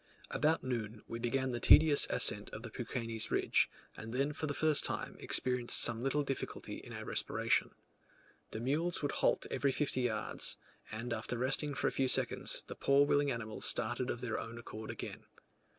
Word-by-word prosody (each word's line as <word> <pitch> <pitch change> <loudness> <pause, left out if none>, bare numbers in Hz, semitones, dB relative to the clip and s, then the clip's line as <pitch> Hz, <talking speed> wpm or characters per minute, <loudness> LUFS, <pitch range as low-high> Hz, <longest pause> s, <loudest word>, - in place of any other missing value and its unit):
About 155 +2 +1
noon 115 -4 -4
we 115 - -5
began 130 +2 -1
the 120 - -2
tedious 150 +3 +7
ascent 105 0 +2
of 110 - -9
the 120 - -7
Peuquenes 115 -2 -4
ridge, - - +2 0.3
and 110 +1 -8
then 135 +4 0
for 155 +1 -3
the 145 - -2
first 155 -2 +2
time - - -2
experienced 125 -1 +2
some 115 -1 +3
little 135 +3 0
difficulty 135 -1 -4
in - - -11
our - - -7
respiration. - - 0 0.8
The 110 - -6
mules 155 +7 0
would 145 - 0
halt - - +1
every 140 - +1
fifty 135 -2 -1
yards, 110 -3 -1 0.3
and 115 +2 -4
after 125 - -3
resting 135 +3 +1
for - - -2
a - - +2
few 135 - +1
seconds 125 - +1
the - - -7
poor 140 +1 +3
willing 145 0 +2
animals 115 -4 -3
started 120 +3 -1
of 120 - -3
their 120 -3 -2
own 115 +1 -7
accord 110 -2 -8
again. - - -7
125 Hz, 180 wpm, -34 LUFS, 115-140 Hz, 0.8 s, tedious